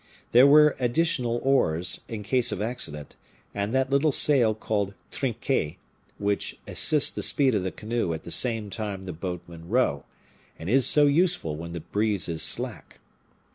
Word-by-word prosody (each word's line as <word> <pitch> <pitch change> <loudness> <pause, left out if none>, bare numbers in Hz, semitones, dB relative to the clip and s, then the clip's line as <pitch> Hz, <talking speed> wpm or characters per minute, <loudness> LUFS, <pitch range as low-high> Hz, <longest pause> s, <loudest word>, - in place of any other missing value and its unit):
There 125 +3 +7
were 150 +1 +6
additional 125 -2 0
oars, 90 -11 +1
in 110 -2 -6
case 125 +3 +1
of - - -4
accident, 105 - -4 0.4
and 100 +1 -3
that 130 0 0
little 140 +2 +3
sail 130 -6 +3
called 100 -2 -3 0.2
trinquet, 105 - -2 0.4
which 100 0 -2
assists 150 -2 +2
the - - -5
speed 135 -3 +3
of 105 - 0
the 95 0 -3
canoe 110 -4 -3
at 80 -1 -5
the 85 - -8
same 115 -3 +1
time 100 -3 -5
the 90 - -6
boatmen 85 -1 -8
row, 110 - +1 0.5
and 80 +5 -5
is 130 0 +3
so 150 +1 +5
useful 150 - +1
when 85 +2 -8
the 85 - -6
breeze 105 +3 -1
is 80 -2 -3
slack. - - -1
110 Hz, 165 wpm, -25 LUFS, 90-130 Hz, 0.5 s, There